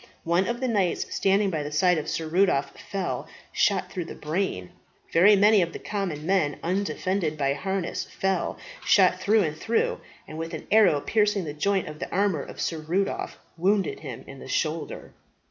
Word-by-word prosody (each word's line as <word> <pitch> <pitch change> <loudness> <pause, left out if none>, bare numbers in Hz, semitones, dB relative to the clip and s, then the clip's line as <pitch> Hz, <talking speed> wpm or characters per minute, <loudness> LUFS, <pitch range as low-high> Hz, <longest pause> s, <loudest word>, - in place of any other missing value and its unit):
One 170 +3 +2
of 235 0 -2
the 260 - 0
knights 200 -7 0
standing 195 0 +2
by 155 -3 -1
the 145 0 -5
side 175 +3 +3
of 150 - -5
Sir 160 - -2
Rudolph 155 -5 +2
fell, 195 -2 -3 0.3
shot 190 -2 +1
through 180 -3 -4
the - - -8
brain. 150 - -3 0.4
Very 195 +5 +7
many 205 +1 +5
of 170 -1 -1
the - - -5
common 185 -8 -4
men, 170 -6 +1
undefended 185 -2 -1
by 140 -2 +1
harness, 190 +4 -3
fell 190 0 -1 0.3
shot - - +4
through 215 0 +3
and 155 -2 -2
through; 225 +8 0 0.3
and 155 +1 -6
an 155 - -8
arrow 205 -9 +5
piercing 210 -1 +1
the 150 -3 -5
joint 195 +5 0
of 150 0 -8
the - - -5
armour 195 -6 +1
of - - -10
Sir 165 - -2
Rudolph, 180 +6 -2 0.2
wounded 200 - +1
him - - -8
in - - -11
the - - -10
shoulder. - - -3
185 Hz, 180 wpm, -26 LUFS, 155-200 Hz, 0.4 s, Very